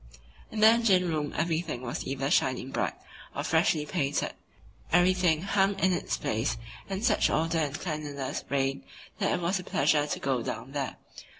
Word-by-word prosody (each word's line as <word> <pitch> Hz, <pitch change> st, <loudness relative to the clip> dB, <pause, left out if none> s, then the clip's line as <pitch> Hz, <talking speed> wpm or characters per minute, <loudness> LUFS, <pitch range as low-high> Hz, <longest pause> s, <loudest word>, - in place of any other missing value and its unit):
In 215 Hz, -, -4 dB
the 215 Hz, -, +9 dB
engine 220 Hz, -6 st, +4 dB
room 155 Hz, -3 st, -1 dB
everything 160 Hz, -5 st, -1 dB
was 120 Hz, -, -4 dB
either 135 Hz, +1 st, -2 dB
shining 130 Hz, 0 st, +1 dB
bright -, -, -1 dB, 0.4 s
or -, -, -2 dB
freshly 150 Hz, -2 st, +2 dB
painted, 145 Hz, -4 st, -1 dB, 0.6 s
everything 175 Hz, -2 st, +3 dB
hung 195 Hz, 0 st, +2 dB
in 190 Hz, -1 st, +3 dB
its -, -, -1 dB
place 115 Hz, +5 st, -1 dB, 0.3 s
and 195 Hz, +3 st, -2 dB
such 220 Hz, -4 st, +3 dB
order 165 Hz, +1 st, +1 dB
and 145 Hz, -1 st, -1 dB
cleanliness 150 Hz, -5 st, -4 dB
reigned 135 Hz, -6 st, 0 dB, 0.4 s
that -, -, +1 dB
it -, -, +1 dB
was 180 Hz, +3 st, 0 dB
a -, -, -7 dB
pleasure 145 Hz, -1 st, +2 dB
to -, -, -3 dB
go 130 Hz, -3 st, 0 dB
down 130 Hz, +3 st, -5 dB
there. 140 Hz, -2 st, -3 dB
155 Hz, 170 wpm, -28 LUFS, 140-185 Hz, 0.6 s, the